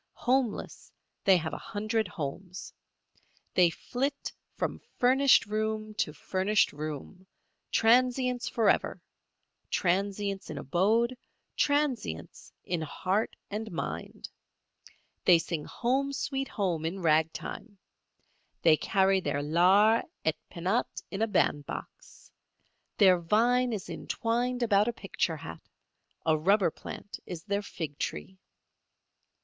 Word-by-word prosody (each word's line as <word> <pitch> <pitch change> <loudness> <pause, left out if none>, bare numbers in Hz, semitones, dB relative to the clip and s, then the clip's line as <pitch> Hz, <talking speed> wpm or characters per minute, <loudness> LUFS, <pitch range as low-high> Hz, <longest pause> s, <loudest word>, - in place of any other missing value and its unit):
Homeless, 250 -3 0 0.4
they 190 -2 +7
have 160 -2 -3
a - - -4
hundred 215 +1 -2
homes. 180 +2 -6 0.8
They 180 -2 +5
flit 270 - -3 0.2
from - - -3 0.2
furnished 265 +2 +5
room 215 0 -2
to - - +1
furnished 190 +7 +1
room, 155 +5 -7 0.4
transients 250 +2 +3
forever—transients 200 -2 -1
in - - -5
abode, 220 - +2 0.4
transients 285 - -1
in 175 -2 -2
heart 185 +7 -1 0.2
and 220 +1 -4
mind. 170 - -5 1.0
They 175 - +8
sing 165 -2 -3
"Home, 265 +3 0
Sweet 270 -1 -2
Home" 180 -7 -1
in 175 +3 -3
ragtime; 165 +7 0 0.9
they 155 -1 +6
carry 195 +1 +2
their 145 -5 -2
lares 190 +8 +4 0.2
et 160 - +2
penates 185 +7 -2
in 195 - -4
a 225 - +3
bandbox; 145 -8 -2 0.7
their 185 -4 +6
vine 240 +8 +2
is 210 -5 -4
entwined 245 +1 -1
about 210 -2 +3
a 240 - 0
picture 185 -6 -2
hat; 85 - -9 0.6
a 160 - +4
rubber 190 +3 +3
plant 205 - -9
is 170 -3 -6
their 200 +1 -1
fig 160 -7 -6
tree. 185 +4 -4
200 Hz, 110 wpm, -29 LUFS, 170-230 Hz, 1.0 s, They